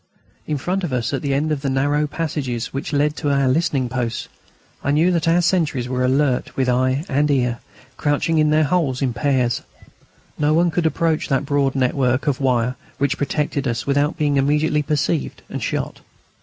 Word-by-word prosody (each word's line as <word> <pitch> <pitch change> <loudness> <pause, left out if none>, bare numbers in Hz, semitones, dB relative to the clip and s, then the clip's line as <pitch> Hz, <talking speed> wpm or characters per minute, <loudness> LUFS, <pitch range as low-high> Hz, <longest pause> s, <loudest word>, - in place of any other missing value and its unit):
In 150 - -1
front 185 +7 -2
of 170 - -2
us, 125 +1 -1
at 135 - -1
the 140 - -2
end 145 +3 0
of 145 -3 -1
the 140 - -1
narrow 145 +3 +1
passages 145 -7 -3
which 135 +1 -4
led 145 0 +2
out - - -17
to 145 - -1
the 140 -1 +2
listening 135 -2 +1
posts, 120 -2 -3 0.5
I - - -1
knew 155 +5 +3
that 170 -2 0
our 170 +2 +3
sentries 155 -9 +1
were 125 0 -1
alert 130 0 +1
with 130 -1 +1
eye 130 +4 +1
and 145 +2 +1
ear, 125 -4 +1 0.4
crouching 150 +2 +1
in 155 0 +3
their 155 +1 +4
holes 145 -4 0
in 125 -3 0
pairs. 125 -1 +1 0.8
No 150 +1 +3
one 170 +1 +3
could 165 0 +1
approach 160 0 0
the 135 -2 +2
broad 140 -1 0
network 130 0 +1
of 145 -1 0
wire 125 -1 +1 0.2
which 140 +1 0
protected 145 -1 -1
us 120 -1 -2
without 145 +3 +1
being 145 -3 +1
immediately 150 +2 +2
perceived 150 +1 -1
and - - -4
shot. - - -3
140 Hz, 195 wpm, -21 LUFS, 130-150 Hz, 0.8 s, their